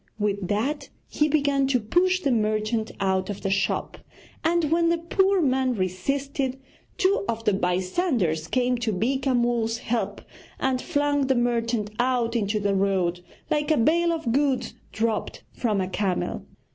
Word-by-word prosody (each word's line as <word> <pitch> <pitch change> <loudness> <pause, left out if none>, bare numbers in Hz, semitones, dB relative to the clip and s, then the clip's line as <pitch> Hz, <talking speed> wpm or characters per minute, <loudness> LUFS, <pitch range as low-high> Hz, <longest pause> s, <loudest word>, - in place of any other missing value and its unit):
With 200 -3 -1
that 230 +9 -1 0.2
he 300 - +1
began 285 -2 +2
to 260 -2 +2
push 360 +12 +2
the 280 - +1
merchant 215 0 0
out 190 -1 0
of 205 - -5
the 195 - -1
shop; 200 0 -1 0.4
and, 330 -2 +1
when 335 0 +3
the 340 - +2
poor 385 +3 +2
man 260 -2 +1
resisted, 265 +8 -2 0.4
two 400 +3 +2
of 225 0 -2
the 210 - +3
bystanders 180 - 0
came 250 -1 +1
to 230 -3 -1
Beeka 260 +6 0
Mull's 235 -2 +1
help, 235 0 -2 0.4
and 260 -1 0
flung 290 -3 +1
the 265 - +3
merchant 235 -3 0
out 245 -2 +1
into 210 -1 0
the 200 -1 0
road, 190 -3 +1 0.3
like 295 0 +1
a 310 - +3
bale 335 +8 +3
of 320 -8 -2
goods 270 0 +1 0.2
dropped 220 -1 -2
from 215 -5 0
a 185 - -1
camel. 190 -1 -2
240 Hz, 160 wpm, -25 LUFS, 210-285 Hz, 0.4 s, when